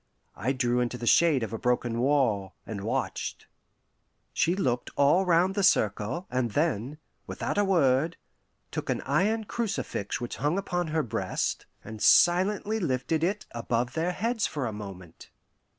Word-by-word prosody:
I 130 - -1
drew 125 -2 +1
into 125 0 -1
the 120 - -6
shade 150 -1 +4
of 110 - -5
a 115 - -3
broken 120 -1 0
wall, 120 -8 +1
and 105 -3 -5
watched. 110 - -3 0.9
She 170 +3 +2
looked 125 -10 -1
all 160 +7 +4
round 175 +2 +3
the 200 - 0
circle, 115 - +1
and 125 -1 0
then, 145 -3 0 0.3
without - - -2
a - - +4
word, 165 -4 +2 0.5
took - - -4
an - - 0
iron 205 +10 +1
crucifix 195 - -3
which 120 -1 -5
hung 150 +6 0
upon 175 -3 -2
her 155 0 0
breast, 110 -5 -2 0.2
and 110 -1 -9
silently 190 - +4
lifted 155 -1 -1
it 200 +4 -1
above 120 +1 -2
their 165 +4 0
heads 225 +3 0
for 145 -4 -3
a 110 - -3
moment. 95 -5 -10
140 Hz, 155 wpm, -28 LUFS, 120-175 Hz, 0.9 s, shade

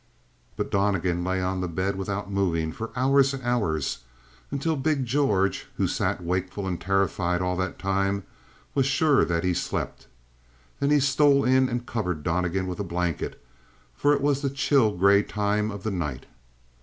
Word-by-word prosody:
But - - -3
Donnegan 95 -3 +1
lay 95 0 -1
on 95 0 -1
the 90 - -1
bed 95 +4 -1
without 100 +1 -4
moving 85 -5 0
for 115 +7 -6
hours 135 +2 +3
and 130 - -8
hours, 100 - 0 0.5
until 145 +4 -1
big 140 -1 0
George, 105 -8 +1
who - - +2
sat 90 - -1
wakeful 90 +3 -2
and 90 -3 -3
terrified 95 -2 +1
all 90 0 -1
that 95 0 -2
time, 95 0 0 0.5
was 135 -2 +2
sure 145 0 +3
that 85 -1 0
he 90 -1 +1
slept. - - -3 0.7
Then 140 - +1
he 150 0 +5
stole 140 0 +4
in 130 0 +4
and 120 0 -3
covered 90 -11 -3
Donnegan 90 +2 0
with 90 +1 -5
a - - -1
blanket, 85 -3 -3 0.6
for 145 - +2
it 145 -1 +2
was 140 -1 +1
the 140 - 0
chill, 135 -3 +2
gray 100 +2 +5
time 105 0 -1
of 100 -2 -7
the 110 - -1
night. 75 -9 -3
100 Hz, 170 wpm, -26 LUFS, 90-130 Hz, 0.7 s, he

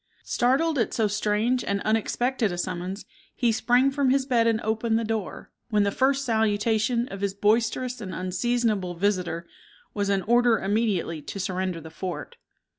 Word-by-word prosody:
Startled 275 +5 +1
at 230 - 0
so 220 -2 +2
strange 215 +4 0
and 200 0 -1
unexpected 225 +1 0
a 175 - -4
summons, 185 +2 -4 0.3
he 240 -2 +2
sprang 245 +4 +3
from 275 -1 +1
his 265 0 +2
bed 235 -4 +2
and 225 -1 +2
opened 225 +1 0
the 230 - -1
door, 220 -3 -4 0.2
when 210 -3 +3
the 200 - +1
first 270 +4 +1
salutation 220 +1 +1
of 195 0 -7
his 200 -1 -1
boisterous 230 +4 +1
and 190 -3 -6
unseasonable 195 0 -1
visitor 180 -3 -1 0.5
was 200 -1 -1
an 195 -1 +1
order 240 0 +4
immediately 195 -6 -1
to 200 - -7
surrender 185 -2 -2
the 160 0 -11
fort. 185 - -6
220 Hz, 165 wpm, -25 LUFS, 195-240 Hz, 0.5 s, order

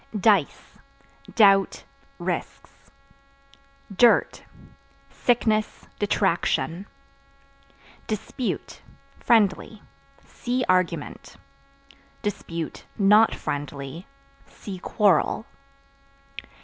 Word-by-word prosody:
Dice 195 -7 +1 0.6
Doubt, 195 -3 +4 0.3
risks. - - -6 1.1
Dirt 240 +3 +4 0.7
Sickness, 220 -3 0
detraction. 190 -2 0 1.2
Dispute 220 +3 -4 0.4
(Friendly) 215 -1 +1 0.4
see 250 +1 -3
Argument; 180 -4 -1 1.6
(not 210 +2 +5
friendly) 145 +3 -6 0.4
see 190 -3 -9
Quarrel. 205 +1 +1
200 Hz, 50 wpm, -24 LUFS, 180-220 Hz, 1.6 s, not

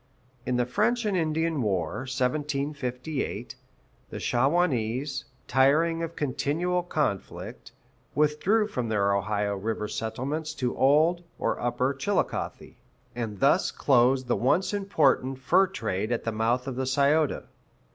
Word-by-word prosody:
In 125 - +1
the 125 - +2
French 235 - +1
and 205 -2 0
Indian 160 -2 0
war 100 - -1
(1758), 140 +1 -2 0.6
the - - -6
Shawanese, 135 -1 0 0.2
tiring 150 +6 +3
of 165 0 -4
continual 150 +6 0
conflict, 150 - -3 0.4
withdrew 150 +9 +2
from 125 - -3
their 100 -2 +2
Ohio 100 +1 -1
River 105 +2 -3
settlements 135 +9 -3
to 125 -1 -2
Old 155 +6 +3
(or - - -1
Upper) 120 +3 0
Chillicothe, 165 +9 -2 0.4
and 110 -5 -4
thus 145 +7 +3
closed 130 -1 +3
the 120 - +2
once 175 - +1
important 145 -10 +1
fur 180 +9 +3
trade 110 - -3
at 120 - -1
the 115 - -1
mouth 115 +3 0
of 130 -2 -5
the 130 -1 -1
Scioto. 140 +3 +2
135 Hz, 125 wpm, -27 LUFS, 120-160 Hz, 0.6 s, tiring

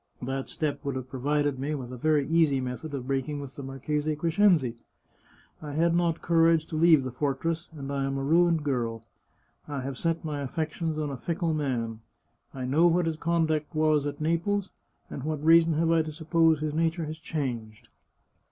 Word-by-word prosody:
That 135 +1 -3
step 150 -3 -3
would 140 -2 -2
have 130 -1 -6
provided 145 +1 0
me 145 +3 -2
with 125 -3 -6
a - - -5
very 150 +2 +1
easy 160 -4 +3
method 130 +4 -5
of 130 -2 -5
break 135 +1 -1
ing 145 -1 -3
with 140 -2 -8
the - - -7
Marchese 150 +3 -2
Crescenzi. 165 - +2 0.8
I 150 -2 -6
had 165 +3 +2
not 170 -2 0
courage 165 -1 +4
to - - -4
leave 160 -3 +5
the 130 - -4
fortress, 150 +6 -2
and 140 -1 -5
I 135 -1 0
am 135 0 -2
a 135 - -2
ruined 165 +2 +3
girl. 115 -5 -2 0.6
I 145 -2 -4
have 130 0 -5
set 165 -1 -1
my 150 -2 -3
affections 155 +3 -3
on 150 -2 -2
a 135 - -5
fickle 170 +4 -1
man. 120 -7 -2 0.5
I 130 -2 -5
know 155 +7 +4
what 175 0 +2
his 165 -1 -1
conduct 160 -1 0
was 155 -2 +2
at 145 0 -5
Naples, 170 +5 0 0.4
and - - -5
what 150 +1 -3
reason 165 0 +6
have 165 +2 +1
I 165 -1 +4
to 155 0 -4
suppose 160 0 +2
his 155 -1 -2
nature 165 +1 0
has 155 +1 -6
changed? 120 -7 -5
150 Hz, 195 wpm, -27 LUFS, 135-165 Hz, 0.8 s, reason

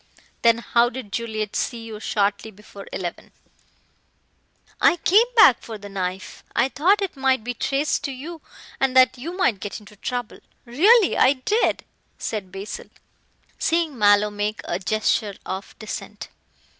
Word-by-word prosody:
"Then 230 -1 +5
how 235 0 +2
did 245 -4 -8
Juliet 220 -2 -3
see 235 -2 -2
you 220 -2 -8
shortly 205 0 -1
before 205 -1 -13
eleven?" 175 -2 -6 1.5
"I 350 - +5
came 420 +8 +4
back 350 - +7
for 225 -2 -8
the 205 0 -10
knife. 185 -1 -5
I 265 - +3
thought 370 +10 +2
it 385 - -4
might 265 -3 +1
be 245 +2 -3
traced 275 +4 -1
to 280 - -3
you 310 +5 -8 0.4
and 260 -1 +1
that 255 0 +5
you 335 +8 -6
might 240 - +2
get 205 +3 -6
into 210 0 -16
trouble. 245 +2 -5 0.3
Really 380 - +4
I 260 - +5
did," 410 - 0 0.3
said 200 -4 -5
Basil, 195 +2 -7 0.7
seeing 325 -3 0
Mallow 205 -1 +4
make 205 +1 -3
a 175 - -3
gesture 210 +1 0
of 190 +2 -6
dissent. 215 - -7
230 Hz, 150 wpm, -23 LUFS, 205-275 Hz, 1.5 s, back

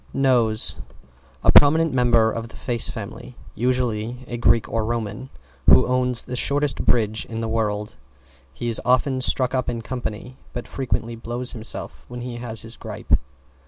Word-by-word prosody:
=NOSE= 120 -5 +3 0.7
A - - +6
prominent 155 +1 +6
member 120 -3 +4
of 115 +1 -5
the - - -16
face 120 -3 +1
family, 115 +3 -8 0.2
usually 125 0 -1
a 120 - -5
Greek 115 -1 +3
or 115 -1 -1
Roman, 115 +2 -3 0.4
who - - +7
owns 125 -1 +1
the 125 - -6
shortest 140 +2 +1
bridge 110 -2 +1
in 115 0 -5
the 115 - -2
world. 105 -4 -2 0.5
He 95 - -5
is 115 - +3
often 130 +1 +2
stuck 125 0 +3
up 130 -1 0
in 115 -1 -4
company, 125 0 -5 0.2
but 120 - -5
frequently 120 -3 -3
blows 120 +2 -4
himself 115 -2 -5
when 120 0 -7
he 120 -1 -5
has 115 -2 -4
his 115 +1 -8
grippe. - - -1
120 Hz, 160 wpm, -23 LUFS, 115-125 Hz, 0.7 s, who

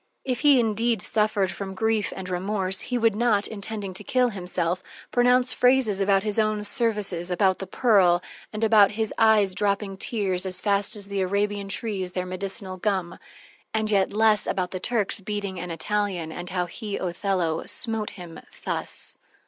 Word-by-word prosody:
If 250 -2 -2
he 290 -3 +5
indeed 225 0 +1
suffered 210 -3 0
from 190 +1 -7
grief 220 0 0
and 190 -1 -7
remorse, 190 +1 0
he 250 - -3
would 225 -3 +2
not, 215 -3 +1
intending 205 -2 -2
to 190 - -9
kill 250 +3 +1
himself, 180 -3 -2 0.3
pronounce 250 +1 +3
phrases 250 -6 +2
about 195 0 +2
his 215 0 0
own 215 -1 0
services, 205 -5 -1
about 190 +1 +1
the 195 - -5
pearl, 190 -6 +3 0.3
and 215 +1 -4
about 215 -2 +5
his 220 0 -2
eyes 215 -4 +4
dropping 200 0 -1
tears 190 -5 -2
"as 180 -1 -1
fast 200 +2 +1
as 200 -1 -5
the 200 -1 -2
Arabian 200 +1 -1
trees 195 -3 -4
their 180 -1 -3
medicinal 185 +1 -4
gum"; 185 -3 -2 0.6
and 220 0 0
yet 195 -2 +2
less 215 0 +2
about 180 -1 -2
the 185 - -5
Turk's 215 0 -1
beating 200 -1 -5
an 180 - -6
Italian 180 -1 -2
and 175 +2 -7
how 180 -1 -1
he, 205 +3 -6
Othello, 180 -2 -2
smote 225 -3 -2
him 170 -3 -10 0.3
_thus! - - +7
200 Hz, 170 wpm, -24 LUFS, 185-220 Hz, 0.6 s, thus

